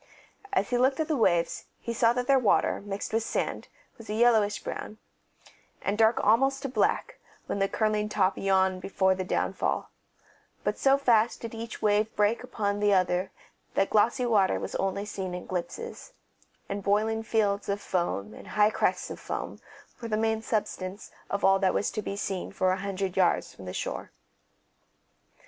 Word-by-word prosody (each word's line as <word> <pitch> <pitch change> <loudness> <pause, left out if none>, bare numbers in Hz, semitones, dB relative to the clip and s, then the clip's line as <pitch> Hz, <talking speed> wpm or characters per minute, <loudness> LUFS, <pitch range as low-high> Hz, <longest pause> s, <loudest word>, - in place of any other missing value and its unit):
As 385 - 0
he 245 - +2
looked 265 +3 +3
at 315 - 0
the 315 - +1
waves 175 -9 +1
he 235 - -4
saw 230 0 +4
that 250 0 -1
their 270 +1 +4
water, 225 -5 +2
mixed 200 +1 -5
with 225 - +2
sand, 225 - -2 0.3
was 225 - -12
a 210 - -2
yellowish 220 -3 +3
brown, 215 - -6 0.9
and 200 - 0
dark 220 +1 +4
almost 270 +5 +3
to 275 - -2
black - - 0 0.3
when - - -3
the 195 - +2
curling 215 -1 0
top 195 -2 +2
yawned 190 -1 +2
before 190 0 +2
the 185 0 -3
downfall; 185 - -1 0.7
but - - -1
so 275 0 +5
fast 235 -4 +2
did 230 -1 -6
each 225 0 -7
wave 210 +1 +2
break 210 +2 +2
one - - -8
upon 205 -1 -1
the 205 0 +3
other 185 0 +2 0.5
that 195 - +2
glossy 235 +4 +3
water 210 -5 +3
was - - -5
only 195 +1 -1
seen 190 -3 -4
in 180 - -7
glimpses, 445 - -5 0.5
and 200 0 -4
boiling 215 +3 +1
fields 210 -3 0
of 200 0 0
foam 105 - -2
and - - -12
high 210 0 +3
crests - - 0
of - - -7
foam - - -5 0.4
were 230 - -4
the 215 -1 0
main 220 0 +1
substance 200 -3 -3 0.2
of 200 - 0
all 195 0 +5
that 190 -1 +2
was - - 0
to 215 - -3
be 200 - -4
seen 195 -2 -3
for 185 -1 +1
a 185 - 0
hundred 195 -1 -3
yards 185 -2 +2
from 95 - -12
the 90 - -5
shore. - - -4
210 Hz, 185 wpm, -28 LUFS, 195-225 Hz, 0.9 s, so